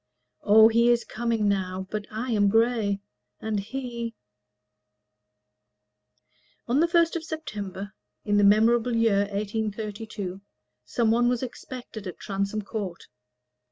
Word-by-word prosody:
'" - - -54
O, 220 +1 +7
he 235 +1 +4
is 240 -1 +3
coming 230 -2 -1
now 190 -1 -1
but 210 -1 -3
I 235 +4 -4
am 205 -2 +3
gray: 225 -2 +2 0.4
And 220 -2 -2
he 235 +1 -5 2.5
On 250 +4 +2
the 335 - +4
first 335 -1 +3
of 335 - -2
September, 205 - -6 0.3
in 205 0 +2
the 205 - +4
memorable 225 +4 +4
year 225 -3 +3
1832, 210 -1 -4 0.4
some 230 -3 +1
one 240 +1 +3
was 245 0 0
expected 245 -4 -7
at 180 - -7
Transome 200 +1 -2
Court. 195 -4 -5
220 Hz, 125 wpm, -26 LUFS, 200-235 Hz, 2.5 s, O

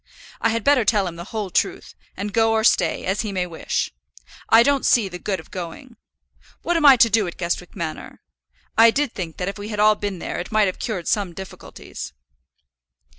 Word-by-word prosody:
I 230 - +3
had 230 -1 -1
better 280 -4 +4
tell 205 -2 +2
him 175 -2 -5
the 170 +1 -8
whole 210 -3 -5
truth, - - -1 0.2
and 200 +1 -4
go 225 -1 +3
or 220 0 +1
stay, 180 -6 +2
as 190 +2 0
he 215 -2 -4
may 185 -2 -1
wish. 165 -2 -3 0.6
I 225 +1 +7
don't 280 +1 +2
see 225 -5 +3
the 180 -1 -8
good 190 -1 -2
of 160 - -14
going. 190 - -8 0.7
What 350 - 0
am 315 -3 +4
I 270 -2 +9
to 230 - +6
do 215 -2 +2
at 170 - -7
Guestwick 175 0 -3
Manor? 160 -2 -6 0.6
I 230 +1 +7
did 280 +2 0
think 170 -4 -6
that 180 - -3
if 195 0 -5
we 205 +1 -6
had 210 -2 -4
all 215 0 +6
been 205 -2 -4
there - - -5
it 175 - -6
might 215 -1 +4
have 185 - -3
cured 190 -7 -4
some 200 -5 0
difficulties." 190 +2 -9
205 Hz, 215 wpm, -22 LUFS, 180-225 Hz, 0.7 s, I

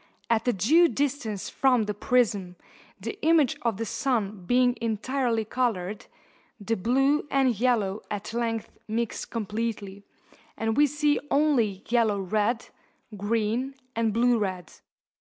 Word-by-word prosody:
At 230 +1 +1
a - - +5
due 305 - +5
distance 275 - -2
from 255 -4 +2
the 210 0 -2
prism, 205 -5 +1 0.4
the 415 - -6
image 315 -5 +4
of 230 -4 0
the 225 - -3
sun 215 -8 -2
being 245 +1 +3
entirely 230 +1 -1
coloured, 215 -5 -2 0.5
the 225 +2 -1
blue 270 +8 +2
and 265 -3 +2
yellow 215 -3 +1
at 205 +2 -5
length 230 -2 -2 0.2
mix 230 +1 -2
completely, 215 -3 -4 0.6
and 225 0 -1
we 295 +2 +5
see 295 +1 +1
only 250 -10 +2
yellow 225 -4 +2
red, 210 +5 -1 0.5
green, 225 +6 -1 0.2
and 225 -1 +1
blue 235 +2 +3
red. 185 -5 -3
230 Hz, 130 wpm, -26 LUFS, 210-255 Hz, 0.6 s, a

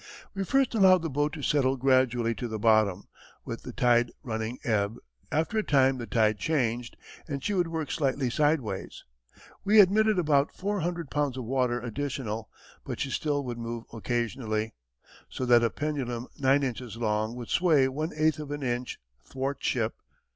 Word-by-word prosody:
We 195 -1 -2
first 270 +3 +2
allowed 190 -5 +5
the 165 - -3
boat 145 +2 0
to 150 - -7
settle 135 -2 +2
gradually 125 -3 +2
to 120 - -5
the 110 -1 -4
bottom, 110 -3 +3 0.4
with - - -5
the - - -8
tide 120 -1 +3
running 110 +1 -3
ebb; 105 -2 0 0.4
after 160 +8 0
a - - 0
time 135 -4 +3
the 120 - -5
tide 110 -4 +2
changed, 120 -3 -1 0.3
and 140 -3 -4
she 205 - -1
would 180 -3 +1
work 160 -2 -3
slightly 135 -4 0
sideways; 140 -9 -1 0.6
we 210 +2 +5
admitted 210 +2 +5
about 150 -4 +2
four 205 +2 -2
hundred 170 -3 -3
pounds 145 -3 0
of 130 - -4
water 125 -1 0
additional, 120 -2 -4 0.3
but - - -6
she 135 - -2
still 145 -1 -1
would 120 -1 -5
move 115 0 -5
occasionally, 115 -1 -2 0.6
so 130 - -4
that 120 -1 +6
a 115 - +3
pendulum 130 -6 -3
nine 140 +1 +3
inches 120 -3 -4
long 110 0 -1
would 120 -2 -7
sway 155 -7 +4
one 150 +4 -3
eighth 155 -1 +2
of 150 -2 -6
an 145 -1 -4
inch 120 0 -2 0.3
(thwartship). 130 -4 -2
130 Hz, 170 wpm, -28 LUFS, 115-150 Hz, 0.6 s, that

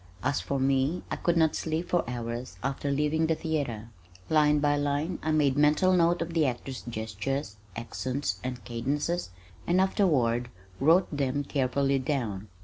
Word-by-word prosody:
As 145 - +1
for 140 - -2
me 135 +5 +1
I - - 0
could 170 -1 0
not 160 -2 +3
sleep 160 +2 -2
for 175 - +2
hours 120 -4 -5
after 135 +1 -2
leaving 150 +3 +1
the 160 - +2
theater. 140 -10 -3 0.4
Line 150 -1 +5
by 145 0 +2
line 145 +4 -1
I 155 - -2
made 150 -4 +3
mental 150 +6 +4
note 170 -1 +3
of 165 0 -7
the 160 -3 +3
actor's 130 +1 -4
gestures, 110 +2 -4 0.2
accents, 130 +4 -3
and 125 -1 -5
cadences 140 - -2 0.4
and 175 +2 +3
afterward 130 - +2 0.3
wrote 165 +3 +4
them 140 0 0
carefully 135 0 +1
down. 120 -8 -2
140 Hz, 155 wpm, -28 LUFS, 125-160 Hz, 0.4 s, Line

